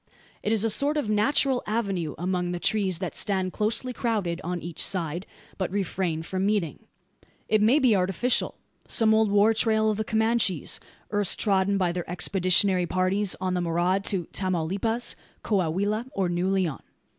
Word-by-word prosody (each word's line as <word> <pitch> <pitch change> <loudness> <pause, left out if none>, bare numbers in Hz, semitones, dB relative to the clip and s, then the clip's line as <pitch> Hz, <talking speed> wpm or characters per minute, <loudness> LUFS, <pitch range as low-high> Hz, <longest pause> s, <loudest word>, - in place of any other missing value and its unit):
It 210 - -1
is 220 -2 +2
a 225 - +2
sort 290 +7 +1
of 230 -8 -1
natural 255 +4 +2
avenue 195 - -2
among 180 +1 -1
the 175 - -3
trees 195 -3 +1
that 185 0 -5
stand 190 -2 0
closely 225 +4 -1
crowded 210 -8 -2
on 180 +1 -3
each 170 -1 -4
side, 175 -1 -2 0.3
but 190 - -1
refrain 185 -4 -2
from 185 +3 -3
meeting. 195 -8 0 0.7
It 215 -1 +2
may 230 +7 +5
be 255 -7 +4
artificial: 195 +7 +1 0.3
some 220 -1 +3
old 220 -1 +3
"war 205 +2 +4
trail" 220 -1 +2
of 210 - -3
the 220 - -1
Comanches, 220 -6 +1 0.3
erst 205 -2 +1
trodden 200 -1 +2
by 180 -3 +1
their 175 -1 -5
expeditionary 185 +1 +2
parties 185 +3 +1
on 185 -1 -1
the 180 - 0
maraud 175 +3 0
to 185 -4 -1
Tamaulipas, 190 +6 -1 0.3
Coahuila, 200 +4 0
or 190 -2 0
New 175 +2 0
Leon. 185 -7 0
195 Hz, 165 wpm, -26 LUFS, 180-215 Hz, 0.7 s, may